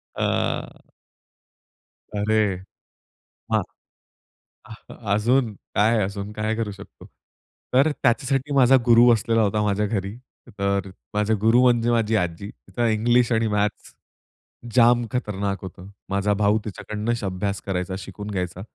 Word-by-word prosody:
अ -, -, -1 dB, 1.4 s
अरे 105 Hz, -1 st, +1 dB, 1.0 s
हां. -, -, +3 dB, 1.5 s
अजून 115 Hz, +2 st, +2 dB, 0.2 s
काय, 110 Hz, +2 st, +3 dB
अजून 100 Hz, +1 st, -5 dB
काय 110 Hz, +1 st, -2 dB
करू 110 Hz, -2 st, -3 dB
शकतो? 100 Hz, 0 st, -13 dB, 0.7 s
तर, 140 Hz, +5 st, +4 dB
त्याच्यासाठी 135 Hz, +3 st, +1 dB
माझा 135 Hz, -1 st, +6 dB
गुरु 120 Hz, +1 st, +6 dB
असलेला 115 Hz, +1 st, +1 dB
होता, 105 Hz, 0 st, +1 dB
माझ्या 105 Hz, 0 st, +1 dB
घरी 100 Hz, -1 st, -3 dB, 0.4 s
तर 100 Hz, -1 st, 0 dB, 0.2 s
माझे 105 Hz, +1 st, +1 dB
गुरु 115 Hz, +3 st, +4 dB
म्हणजे 120 Hz, -2 st, +3 dB
माझी 115 Hz, -1 st, +1 dB
आजी. 90 Hz, 0 st, -2 dB
तिचं 120 Hz, -1 st, -4 dB
इंग्लिश 120 Hz, +3 st, +2 dB
आणि 115 Hz, -1 st, +2 dB
मॅथ्स 105 Hz, 0 st, -2 dB, 0.8 s
जाम 120 Hz, 0 st, +5 dB
खतरनाक 100 Hz, -5 st, -2 dB
होतं. 95 Hz, +1 st, -10 dB, 0.2 s
माझा 100 Hz, +1 st, +1 dB
भाऊ 105 Hz, +1 st, +2 dB
तिच्याकडनं 105 Hz, +2 st, -4 dB
अभ्यास 100 Hz, +1 st, -3 dB
करायचा, 95 Hz, -1 st, -2 dB
शिकून 100 Hz, +2 st, -8 dB
घ्यायचा. 90 Hz, -1 st, -4 dB
105 Hz, 120 wpm, -23 LUFS, 100-115 Hz, 1.5 s, माझा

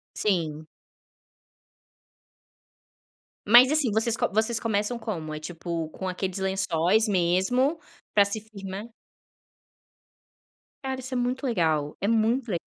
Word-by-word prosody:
Sim. 160 Hz, -6 st, -1 dB, 2.8 s
Mas, 245 Hz, +5 st, +8 dB
assim, 295 Hz, -7 st, +3 dB
vocês 225 Hz, +1 st, +1 dB
co -, -, 0 dB
vocês 220 Hz, +2 st, +3 dB
começam 220 Hz, +1 st, -1 dB
como, 160 Hz, -10 st, -5 dB
é, 155 Hz, -, -6 dB
tipo, 165 Hz, 0 st, -5 dB
com 190 Hz, +3 st, -6 dB
aqueles 185 Hz, +1 st, -3 dB
lençóis 190 Hz, +2 st, +1 dB
mesmo 200 Hz, -, +1 dB, 0.4 s
para 205 Hz, -1 st, +6 dB
se 200 Hz, +2 st, -2 dB
firmar? 200 Hz, 0 st, -8 dB, 1.9 s
Cara, 265 Hz, -1 st, -4 dB
isso 260 Hz, +1 st, -6 dB
é -, -, -1 dB
muito 250 Hz, +3 st, -2 dB
legal. 160 Hz, -, 0 dB
É 200 Hz, -, -1 dB
muito 230 Hz, +2 st, +1 dB
le 175 Hz, -, 0 dB
205 Hz, 120 wpm, -26 LUFS, 175-235 Hz, 2.8 s, Mas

